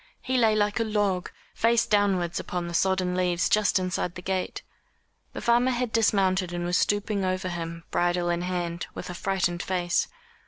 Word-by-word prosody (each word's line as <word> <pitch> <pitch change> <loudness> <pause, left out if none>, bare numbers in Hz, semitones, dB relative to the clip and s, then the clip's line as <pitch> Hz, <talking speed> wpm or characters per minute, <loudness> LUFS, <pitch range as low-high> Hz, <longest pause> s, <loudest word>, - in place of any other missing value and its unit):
He 260 - -1
lay 225 -3 +4
like 210 +1 +1
a - - +2
log, 205 -4 0 0.2
face 230 0 +3
downwards 195 -5 +1
upon 175 -1 -4
the 170 - -6
sodden 185 0 +1
leaves 180 -1 +1
just 210 -2 +3
inside 180 -1 -2
the 180 - -8
gate. 185 0 -2 0.7
The - - -6
farmer 240 +2 +3
had 250 -2 -1
dismounted 195 -5 +2
and 175 0 -2
was 175 0 0
stooping 205 -1 0
over 185 0 -1
him, 170 -1 -5
bridle 175 0 +1
in 170 0 -1
hand, 175 -1 -3
with 180 - -6
a - - -6
frightened 175 -2 -1
face. 180 -1 0
185 Hz, 180 wpm, -26 LUFS, 175-205 Hz, 0.7 s, lay